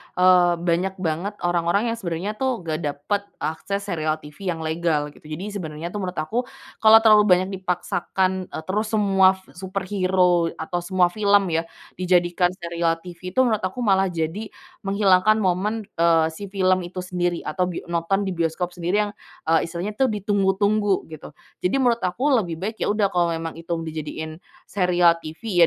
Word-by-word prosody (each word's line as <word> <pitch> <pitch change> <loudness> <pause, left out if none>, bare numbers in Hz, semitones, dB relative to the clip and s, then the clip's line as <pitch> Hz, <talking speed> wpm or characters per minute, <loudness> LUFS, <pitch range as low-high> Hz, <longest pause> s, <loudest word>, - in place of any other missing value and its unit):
eee, 180 -1 +5
banyak 175 +3 -1
banget 170 +5 -2
orang-orang 175 +6 +1
yang 230 - -4
sebenarnya, 175 +1 -3
tuh, 260 -7 -1
nggak 155 -2 -2
dapet 150 +6 -2 0.2
akses 200 +6 -3
serial 155 -5 -1
TV 150 +6 -9
yang 160 - -7
legal 160 -2 0
gitu. 150 - -17
Jadi 175 +7 -5
sebenarnya, 165 -4 -5
tuh, 210 - -4
menurut 185 -2 -4
aku 225 +11 -2 0.3
kalau 220 0 +7
terlalu 215 -2 +7
banyak 185 0 +4
dipaksakan, 185 +1 -1
eee, 160 - -7
terus 210 +5 -1
semua 195 -3 +4 0.2
superhero 185 -2 +1
atau 175 +2 -3
semua 180 0 +1
film, 205 0 +3
ya, 165 +1 0 0.3
dijadikan 180 0 +2
serial 170 -2 -2
TV, 180 +1 -9
tuh, 260 - +5
menurut 215 - +1
aku 190 +7 -3
malah 195 -3 +3
jadi 170 +5 -3 0.3
menghilangkan 195 +1 +3
momen, 210 +2 0 0.2
eee, 165 -1 +4
si 200 +5 -8
film 185 -1 +2
itu 185 +1 -6
sendiri 175 -1 -2
atau 180 -1 -1
bi 180 - -5
nonton 170 +4 0
di 190 - -2
bioskop 170 +1 -1
sendiri 180 +4 0
yang, 205 - -4 0.3
eee, 165 0 +2
istilahnya, 175 +4 -4
tuh, 265 - +4
ditunggu-tunggu 205 -1 +1
gitu. 155 -1 -10 0.2
Jadi 180 - 0
menurut 235 -2 +3
aku 240 +11 0
lebih 195 -11 +1
baik, 220 +2 -4
ya, - - 0
udah 205 -1 +1
kalau 175 -2 +1
memang 165 0 -5
itu 165 - -13
mau 165 - -4
dijadiin 155 0 -6 0.2
serial 175 -3 +3
TV, 175 +5 -4
180 Hz, 170 wpm, -23 LUFS, 170-200 Hz, 0.3 s, kalau